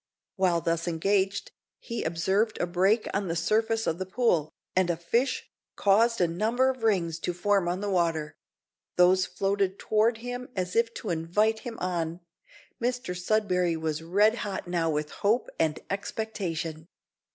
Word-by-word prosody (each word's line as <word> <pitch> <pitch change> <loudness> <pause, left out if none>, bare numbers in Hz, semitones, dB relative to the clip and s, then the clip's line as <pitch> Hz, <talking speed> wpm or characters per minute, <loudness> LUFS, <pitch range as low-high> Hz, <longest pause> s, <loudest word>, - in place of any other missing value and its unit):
While 180 -4 +2
thus 165 +1 -1
engaged, 195 +4 0 0.3
he 235 -1 -5
observed 190 +7 0
a - - +1
break 190 +6 +2
on 200 -1 -1
the 165 - -1
surface 220 +6 +1
of 165 +2 -1
the 185 - -2
pool, 185 -8 +1 0.2
and 185 -1 +3
a 170 - +1
fish 230 +11 0 0.3
caused 225 +4 +3
a 175 - +4
number 225 +10 +1
of 255 -2 -10
rings 175 -7 +1
to 175 - -2
form 195 0 +2
on 180 +2 -2
the 205 - -2
water; 165 -4 0 0.6
those 180 +1 +5
floated 195 +1 0
toward 220 +2 +2
him 245 +2 -6
as 180 -1 -2
if 230 0 +3
to 210 - -4
invite 205 +7 +1
him 235 -2 -7
on. 170 -2 -2 0.6
Mr 245 -6 -1
Sudberry 180 -3 +1
was 160 -1 -2
red 205 +7 +3
hot 200 -3 -4
now 170 -2 0
with 150 -1 -2
hope 220 +5 0
and 155 -1 +1
expectation. 175 -6 -4
190 Hz, 160 wpm, -28 LUFS, 170-220 Hz, 0.6 s, those